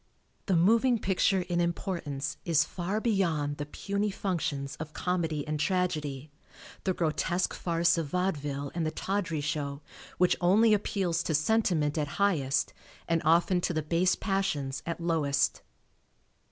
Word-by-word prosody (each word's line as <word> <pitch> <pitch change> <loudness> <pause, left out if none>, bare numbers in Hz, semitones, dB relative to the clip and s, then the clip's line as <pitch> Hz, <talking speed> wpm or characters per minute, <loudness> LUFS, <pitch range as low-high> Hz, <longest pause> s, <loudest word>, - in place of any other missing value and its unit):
The 190 - +3
moving 230 +8 +4
picture 190 -1 +2
in 175 -1 -1
importance 170 -5 -3
is 160 -3 +3
far 190 +4 -3
beyond 165 -10 0
the 145 - -4
puny 200 +6 -2
functions 150 -8 -2
of 155 -1 -7
comedy 165 -5 -1
and 150 0 -2
tragedy. 150 -5 -1 0.5
The 190 - +2
grotesque 175 +2 0
farce 170 0 +1
of 160 - -2
vaudeville 145 -5 -2
and 170 - -1
the 155 - 0
tawdry 165 -1 -2
show 145 -1 -3 0.3
which 180 0 +4
only 210 +5 +5
appeals 190 -4 0
to 160 - 0
sentiment 155 -3 +1
at 150 - -1
highest 150 -10 +1 0.3
and 165 -1 +1
often 170 +3 +3
to 175 - -1
the 155 - 0
base 175 +4 +2
passions 190 -10 -1
at 170 - -3
lowest. 150 -5 +1
170 Hz, 140 wpm, -29 LUFS, 150-185 Hz, 0.5 s, only